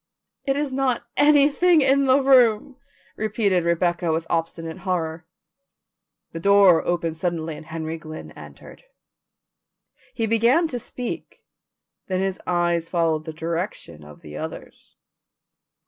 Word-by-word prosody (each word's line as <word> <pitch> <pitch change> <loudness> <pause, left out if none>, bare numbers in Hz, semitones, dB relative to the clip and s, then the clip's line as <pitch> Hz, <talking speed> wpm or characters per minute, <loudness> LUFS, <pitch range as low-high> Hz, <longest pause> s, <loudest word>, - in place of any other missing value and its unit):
"It 275 -1 0
is 290 -2 -2
not 260 -3 0
anything 300 +3 +4
in 275 +1 +3
the 260 +2 +5
room," 255 -2 +3 0.4
repeated 205 -4 0
Rebecca 170 0 0
with 160 +1 -1
obstinate 165 0 -3
horror. 170 -3 -3 1.0
The 165 - -6
door 200 -2 +5
opened 165 -2 -2
suddenly 165 -2 -3
and 155 - -12
Henry 160 0 -5
Glynn 155 -1 -9
entered. - - -14 1.3
He 225 - -1
began 235 +9 +3
to 245 - -3
speak, 245 +1 -7 0.6
then 185 -1 -1
his 190 -1 -2
eyes 175 -1 0
followed 165 -3 0
the 160 - -5
direction 160 - -5
of 75 0 -15
the 75 -1 -10
others'. - - -9
180 Hz, 125 wpm, -23 LUFS, 165-245 Hz, 1.3 s, the